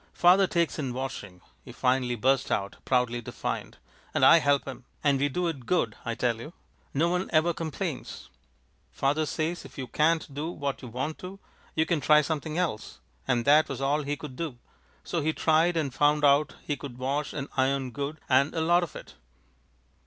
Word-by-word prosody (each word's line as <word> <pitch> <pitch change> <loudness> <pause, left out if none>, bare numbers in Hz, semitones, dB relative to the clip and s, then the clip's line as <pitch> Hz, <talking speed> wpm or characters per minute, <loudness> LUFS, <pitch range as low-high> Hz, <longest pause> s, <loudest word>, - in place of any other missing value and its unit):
"Father 185 +2 +5
takes 170 -2 0
in 135 -4 -2
washing," 120 -8 -6 0.2
he - - -11
finally 125 -1 +1
burst 135 +3 +1
out, 100 0 -1
proudly 125 -2 +1
defiant, - - -5 0.4
"and - - +4
I 165 - +8
help 145 -2 +2
him, 130 0 -8 0.2
and 140 -2 +3
we 145 +1 +2
do 180 +6 -1
it 140 -8 -5
good, 120 -12 +1
I 115 - -3
tell 120 -1 0
you! 155 +8 -9 0.4
No 155 +5 +2
one 180 +2 -1
ever 165 +2 +3
complains. 160 -3 -5 0.6
Father 150 +3 0
says 160 +4 -2
if - - -13
you 130 - -4
can't 155 +2 +1
do 150 +4 -3
what 140 -5 -4
you 125 - -8
want 130 +7 -4
to, 185 +2 -8 0.4
you 160 - +2
can 165 -3 0
try 150 +2 +6
something 155 +1 -3
else, 165 -12 -2 0.3
and 120 -1 +1
that 150 +2 +5
was 135 -2 -4
all 140 +2 +1
he 145 0 -3
could 140 -3 -8
do, 150 -4 -4 0.5
so 170 - -2
he 155 +2 0
tried, 165 +3 +2
and 145 -5 -1
found 150 +1 +3
out 145 +2 +4
he 145 - -2
could 140 -4 -9
wash 140 +3 -2
and 140 -1 -4
iron 130 -1 +1
good, 145 +3 -4
and 140 +4 +3
a 160 - 0
lot 175 +2 +4
of 175 - -5
it!" - - -10
145 Hz, 195 wpm, -27 LUFS, 130-160 Hz, 0.6 s, I